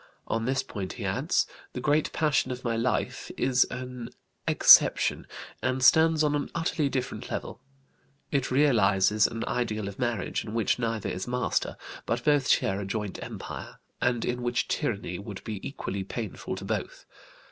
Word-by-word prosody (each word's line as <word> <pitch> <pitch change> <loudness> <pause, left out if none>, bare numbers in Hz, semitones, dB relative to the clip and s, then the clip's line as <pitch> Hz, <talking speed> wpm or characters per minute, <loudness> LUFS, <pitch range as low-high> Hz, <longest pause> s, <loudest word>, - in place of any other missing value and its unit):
On 115 0 -1
this 130 +1 0
point 95 -3 -5
he - - -6
adds: - - +1 0.3
"The - - -4
great 150 +1 +1
passion 150 -4 +1
of 125 0 -5
my 115 -1 0
life 115 +3 -1
is 130 0 +3
an 125 -1 -6 0.4
exception, - - +6 0.3
and 130 0 0
stands 160 +3 +6
on 150 -1 +2
an 145 -1 -1
utterly 160 -3 0
different 130 -2 -3
level. - - -5 0.7
It 135 -2 0
realizes 105 -7 +4
an 115 0 -4
ideal 110 -5 -2
of 100 - -8
marriage 120 -6 -1
in 110 0 -7
which 115 +1 +1
neither 115 -3 -1
is 90 +4 -4
master, 125 +1 -1 0.3
but - - -1
both 145 -3 +3
share 95 +1 +2
a - - -4
joint 105 -1 -4
empire, - - -7 0.2
and 120 -1 +1
in 125 0 -2
which 120 0 0
tyranny 100 -5 -2
would 100 -1 -8
be 105 -3 -5
equally 100 -8 -4
painful 110 +2 -5
to - - -7
both. - - -4
120 Hz, 165 wpm, -28 LUFS, 105-130 Hz, 0.7 s, exception